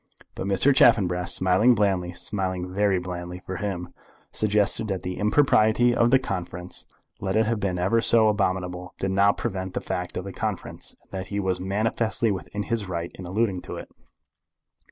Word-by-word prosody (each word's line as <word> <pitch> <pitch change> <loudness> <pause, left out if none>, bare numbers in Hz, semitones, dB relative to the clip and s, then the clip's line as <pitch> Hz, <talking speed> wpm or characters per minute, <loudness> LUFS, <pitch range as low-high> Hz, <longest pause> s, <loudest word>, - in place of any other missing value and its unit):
But - - -5
Mr. 100 +8 +4
Chaffanbrass, 90 -7 +4
smiling 95 +7 +4
blandly, 95 -4 +1
smiling 95 -1 -3
very 100 -1 +2
blandly 90 0 -5
for 95 - -4
him, 95 -4 -4 0.4
suggested 105 0 +2
that 95 -3 -3
the 90 0 -4
impropriety 110 +1 +4
of 120 0 +3
the 135 - +6
conference, 90 -7 -5 0.3
let 95 0 -2
it 110 0 +3
have 115 0 0
been 95 -3 -1
ever 95 +6 +2
so 115 -1 +5
abominable, 90 -3 -1
did 95 - -2
not 100 +1 +3
prevent 95 -1 -4
the - - 0
fact 90 -2 -4
of 90 - -3
the 100 0 -7
conference, - - -4
and - - -34
that 95 -1 -5
he 100 - -3
was 95 -2 -1
manifestly 110 +3 0
within 100 +2 -4
his 110 -4 -2
right 85 -1 -3
in 90 - -9
alluding 95 -1 0
to - - -7
it. - - -8
95 Hz, 175 wpm, -25 LUFS, 90-105 Hz, 0.4 s, the